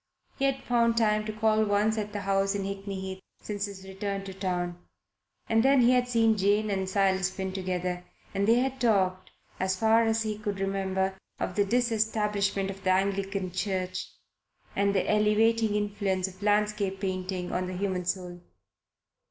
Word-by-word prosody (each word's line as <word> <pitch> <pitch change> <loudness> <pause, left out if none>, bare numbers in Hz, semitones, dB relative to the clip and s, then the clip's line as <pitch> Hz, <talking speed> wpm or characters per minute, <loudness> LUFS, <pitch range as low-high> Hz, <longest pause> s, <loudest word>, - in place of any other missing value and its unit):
He 275 - +2
had 270 0 0
found 235 -1 +2
time 215 -2 +2
to 215 - -3
call 215 0 +2
once 210 +1 +2
at 210 -1 -3
the 205 -1 -4
house 195 0 +1
in 200 - -2
Hickney 195 0 -4
Heath 190 0 -5 0.2
since 205 -1 -3
his 195 -1 -9
return 195 0 -4
to 195 -1 -7
town, 180 -2 -2 0.7
and 225 0 +3
then 270 +1 +5
he 240 +1 +5
had 250 -1 +3
seen 225 -2 +3
Jane 205 +2 +2
and 190 -1 -1
Silas 190 -1 +2
Finn 190 0 -4
together 180 -1 -2 0.3
and 200 +1 0
they 230 - +6
had 260 +1 0
talked, 185 -5 +2 0.3
as 190 0 +1
far 225 +3 +4
as 225 0 +1
he 215 -1 -3
could 205 -2 -3
remember, 190 0 -1 0.2
of - - -2
the 205 - +3
Disestablishment 210 -4 0
of 195 0 -11
the 185 - +1
Anglican 195 0 0
Church 185 -1 -2 0.7
and 200 0 +2
the 190 - +1
elevating 215 +1 +3
influence 200 -2 0
of 185 +1 -12
landscape 210 -2 +1
painting 185 -2 -3
on 180 0 -1
the 185 0 -5
human 185 -2 -1
soul. 180 -1 -3
200 Hz, 175 wpm, -28 LUFS, 190-215 Hz, 0.7 s, they